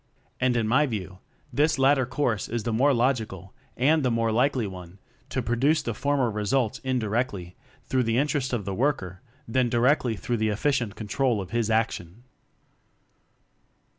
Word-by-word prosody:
And, 125 -1 +2
in 115 -2 +1
my 140 +6 +3
view, 95 -6 -5 0.3
this 150 +4 +2
latter 135 -1 +3
course 125 -4 -1
is 115 -1 -2
the 115 - -2
more 135 +6 +4
logical 115 -7 -1 0.2
and 150 +5 +3
the 130 - +1
more 115 -1 +1
likely 125 +1 +2
one 90 -1 -9 0.3
to - - -2
produce 135 +8 +2
the 115 - -2
for 145 +6 0
mer 125 -4 +1
results 105 +3 0
indirectly 110 -7 -2 0.3
through 130 - +1
the 115 +1 +1
interest 140 -1 0
of 115 -6 -2
the 100 - -3
worker 100 - -1 0.3
than 125 +1 +1
directly 120 0 +2
through 120 +3 -2
the 110 0 +1
efficient 115 0 0
control 115 +2 0
of 95 -1 -6
his 115 -2 0
action. 110 -2 -1
120 Hz, 165 wpm, -26 LUFS, 105-130 Hz, 0.3 s, more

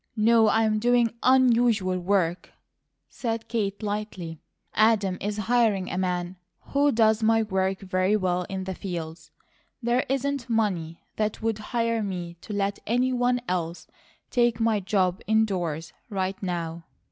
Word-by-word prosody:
"No, 225 0 +5
I'm 220 -1 +2
doing 240 0 +3
UNUSUAL 235 -7 +3
work," 180 -2 0 0.5
said 225 -2 -4
Kate, 210 -2 -2
lightly. 205 -6 -4 0.3
"Adam 215 -4 +3
is 205 +1 -2
hiring 215 -3 +1
a 180 - -3
man 180 0 -2 0.2
who 285 +1 +1
does 220 -1 +3
my 225 0 +3
work 190 -1 -1
very 185 +2 +1
well 180 -2 0
in 190 -1 -3
the 190 0 -4
fields; 165 -4 -6 0.5
there 240 +1 +1
isn't 275 -2 -1
money 185 -8 -1
that 215 0 -2
would 225 -1 0
hire 230 0 -1
me 180 -4 -4
to - - -9
let 200 -1 -1
any 250 +3 +2
one 245 0 +1
else 170 -1 -2 0.5
take 240 -2 +2
my 225 -2 +2
job 185 -2 0
indoors, 185 -8 0 0.2
right 190 -2 -2
now." 170 -3 -3
210 Hz, 140 wpm, -26 LUFS, 185-230 Hz, 0.5 s, No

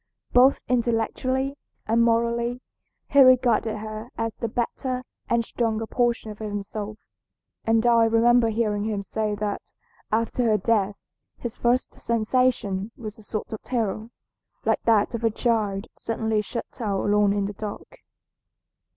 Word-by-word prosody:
Both 255 +2 +6
intellectually 255 +3 0 0.3
and 225 +2 +2
morally 235 +1 +1 0.5
he 280 - +6
regarded 245 -4 +4
her 215 +2 -6
as 225 -1 -2
the 230 - -3
better 250 +3 -2 0.3
and 235 -1 +2
stronger 225 -2 -1
portion 235 -2 0
of 210 - -11
himself, 210 0 -5 0.7
and 225 +1 +3
I 235 -1 +5
remember 230 +1 +4
hearing 210 -2 0
him 210 -2 -2
say 210 +1 -2
that 205 0 -4 0.4
after 230 +2 +1
her 215 -2 +4
death 210 -3 +1 0.4
his 240 -2 -5
first 245 +2 +1
sensation 225 -4 +1
was 215 -2 -8
a - - -12
sort 215 +1 -5
of 220 - -5
terror, 220 -3 -2 0.6
like - - +2
that 225 0 +3
of 235 0 -4
a 225 - +4
child 215 -3 0
suddenly 220 -1 -1
shut 230 +3 -7
out 200 -3 0
alone 205 0 +3
in 200 0 0
the 205 - -4
dark. 205 +1 -8
225 Hz, 140 wpm, -25 LUFS, 210-235 Hz, 0.7 s, Both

